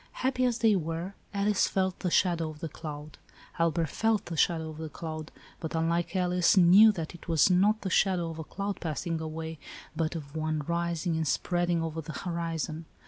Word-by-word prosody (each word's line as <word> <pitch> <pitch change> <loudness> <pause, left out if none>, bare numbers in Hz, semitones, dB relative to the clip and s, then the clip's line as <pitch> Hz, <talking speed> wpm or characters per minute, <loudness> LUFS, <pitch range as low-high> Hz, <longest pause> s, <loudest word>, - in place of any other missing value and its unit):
Happy 255 -1 +2
as 245 -2 +1
they 225 -3 +4
were, 165 +2 -3 0.2
Alice 200 0 +2
felt 190 -1 -1
the 180 - -1
shadow 170 -2 +2
of 155 -1 -10
the 165 - -4
cloud. 150 -1 -8 0.4
Albert 165 -1 +1
felt 225 +2 +1
the 170 - -5
shadow 160 0 +1
of 155 - -11
the 160 -1 -5
cloud, 155 0 -6 0.3
but, 160 0 -5
unlike 165 +3 0
Alice, 180 0 +3
knew 190 +5 +8
that 165 -6 -5
it 175 - -13
was 165 +1 +4
not 205 +4 +3
the 190 - -3
shadow 180 -4 +2
of 160 - -8
a - - -4
cloud 200 +5 -4
passing 165 0 -3
away, 160 0 -5 0.4
but 165 0 -1
of 145 -2 -7
one 155 -1 -1
rising 170 0 -1
and 160 -1 -1
spreading 175 0 0
over 160 0 -3
the 160 +1 -8
horizon. 165 -1 -3
170 Hz, 195 wpm, -29 LUFS, 160-185 Hz, 0.4 s, knew